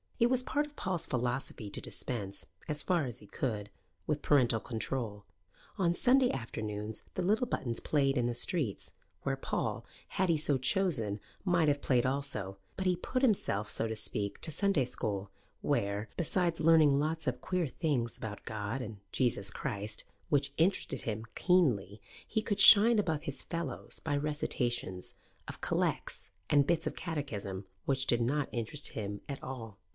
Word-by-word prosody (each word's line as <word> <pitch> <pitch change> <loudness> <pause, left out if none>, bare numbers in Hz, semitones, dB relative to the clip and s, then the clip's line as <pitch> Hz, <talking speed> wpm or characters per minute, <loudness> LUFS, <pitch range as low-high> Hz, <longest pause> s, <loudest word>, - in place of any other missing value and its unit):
It 235 - +5
was 255 -1 +4
part 295 +3 0
of 295 - -19
Paul's 185 - -2
philosophy 120 -3 -2
to - - -2
dispense, 100 -6 -4 0.2
as 150 -1 -2
far 175 -5 +2
as 125 -1 -6
he 105 - -14
could, 105 -5 -3 0.4
with 150 -1 0
parental 125 -6 +4
control. 110 -3 -3 0.5
On 175 -4 +3
Sunday 255 +4 +4
afternoons 110 -3 -4
the 185 - -1
little 215 +7 +2
Buttons 120 - -2
played 140 -2 +2
in 120 - +2
the 120 - -1
streets, 130 - -1 0.3
where - - 0
Paul, - - -2 0.3
had 190 -1 0
he 165 - +4
so 150 -2 +2
chosen, 130 - +2 0.2
might 175 -4 +3
have 145 -1 +2
played 125 -2 +2
also: 130 -8 -2 0.2
but 190 - -2
he 180 - +4
put 255 +9 -2
himself, 105 - +2
so 115 - +1
to 110 - -3
speak, 100 -1 -3
to 160 - -1
Sunday 195 -6 +2
school, 100 -5 -3 0.3
where, 100 +2 0
besides 170 0 +1
learning 155 -3 +6
lots 155 +1 -1
of 125 -1 -1
queer 180 -3 0
things 130 -5 -1
about 105 -2 -6
God 110 +3 -3
and 110 -3 -6
Jesus 115 -6 +3
Christ 105 +1 -3 0.3
which 140 -1 +2
interested 165 -6 +2
him 110 0 -3
keenly, 120 - +2 0.3
he 220 - 0
could 205 -3 -1
shine 225 +2 +9
above 160 -7 0
his 135 -2 -4
fellows 165 -5 -4
by 145 -2 -1
recitations 120 -10 -1 0.3
of - - -8
collects - - -1 0.2
and 145 -1 +5
bits 165 -1 +1
of - - -3
Catechism, 105 - -4 0.2
which 135 -1 +1
did 120 -1 +3
not 140 +4 +1
interest 120 +6 -2
him 100 -1 -5
at 140 - -4
all. 115 -6 -7
135 Hz, 165 wpm, -32 LUFS, 110-165 Hz, 0.5 s, shine